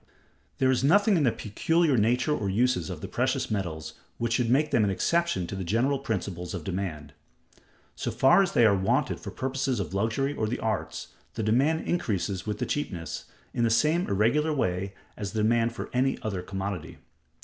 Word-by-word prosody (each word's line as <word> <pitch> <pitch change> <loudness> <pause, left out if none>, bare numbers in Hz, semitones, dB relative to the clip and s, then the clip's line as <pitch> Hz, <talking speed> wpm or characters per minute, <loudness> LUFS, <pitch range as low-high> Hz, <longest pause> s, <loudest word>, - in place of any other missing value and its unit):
There 130 0 +3
is 130 -1 +1
nothing 200 +8 +5
in 165 - +2
the 120 - +4
peculiar 155 - +1
nature 125 +6 +2
or 100 -7 -2
uses 100 -4 +1
of - - -6
the - - -5
precious - - -1
metals 80 -6 -3 0.2
which 115 -1 -1
should 120 -1 +1
make 150 +5 +3
them 120 -6 +3
an 100 - +2
exception 170 - +1
to 95 - -6
the 95 - -3
general 120 +9 +1
principles 95 -7 -3
of 85 - -5
demand. 80 -6 -4 0.8
So - - -3
far 135 +9 +5
as 190 - 0
they 120 - +5
are 100 -2 +5
wanted 95 0 0
for - - -7
purposes 130 -2 -2
of 95 -2 -4
luxury 115 +8 0
or 110 -6 -1
the 120 - -2
arts, 110 -2 -3 0.3
the 110 - -2
demand 135 +10 +2
increases 100 - -1
with 105 -1 -2
the - - -2
cheapness, 90 - -4 0.3
in 120 - 0
the 115 - +3
same 155 +9 +2
irregular 120 +11 +2
way 95 -4 -1 0.2
as 100 0 -5
the 110 -1 0
demand 115 +1 +2
for - - -6
any 130 +2 +1
other 100 -4 -2
commodity. 95 -2 -5
110 Hz, 195 wpm, -27 LUFS, 95-135 Hz, 0.8 s, nothing